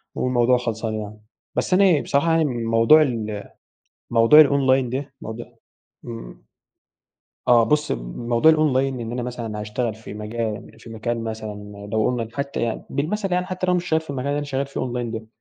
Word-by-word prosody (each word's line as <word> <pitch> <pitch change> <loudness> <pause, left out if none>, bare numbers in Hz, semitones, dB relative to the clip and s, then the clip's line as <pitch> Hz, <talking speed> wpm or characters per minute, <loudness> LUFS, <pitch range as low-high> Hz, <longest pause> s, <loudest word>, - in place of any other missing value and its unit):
والموضوع 125 0 +2
خلصان 115 -2 -3
يعني. 105 0 -7 0.3
بس - - 0
أنا 185 -5 +5
بصراحة 155 +4 +1
يعني 165 -1 +3
موضوع 115 +4 +4
ال 110 -7 -2 0.6
موضوع 120 +7 +8
الonline 135 -3 +2
ده 135 +1 -4
موضو 110 +2 -6 0.6
امم، 115 - -9 1.0
آه 120 -2 +6
بُصي، 150 +5 +1 0.2
موضوع 120 +6 +4
الonline 155 -4 +2 0.2
إن 115 0 -5
أنا 125 - -3
مثلًا 115 -3 -5
هاشتغل 110 +1 -2
في 110 -1 -10
مجال 110 +1 -5
في 115 - -12
مكان 115 +1 -3
مثلًا 105 -2 -7
لو 110 -1 +2
قلنا 120 -3 -1
حتى 140 0 -3
يعني 115 -1 -2
بالمثل 185 +7 -2
يعني 180 0 +1
حتى 185 0 -3
لو 180 - +2
أنا 180 - +3
مش 175 - -5
شغال 160 0 +2
في 160 - -9
المكان 135 0 -4
اللي 145 +1 0
أنا 145 - -2
شغال 135 0 -2
فيه 140 - -5
online 120 -2 -3
ده، 110 0 -6
120 Hz, 180 wpm, -22 LUFS, 110-140 Hz, 1.0 s, موضوع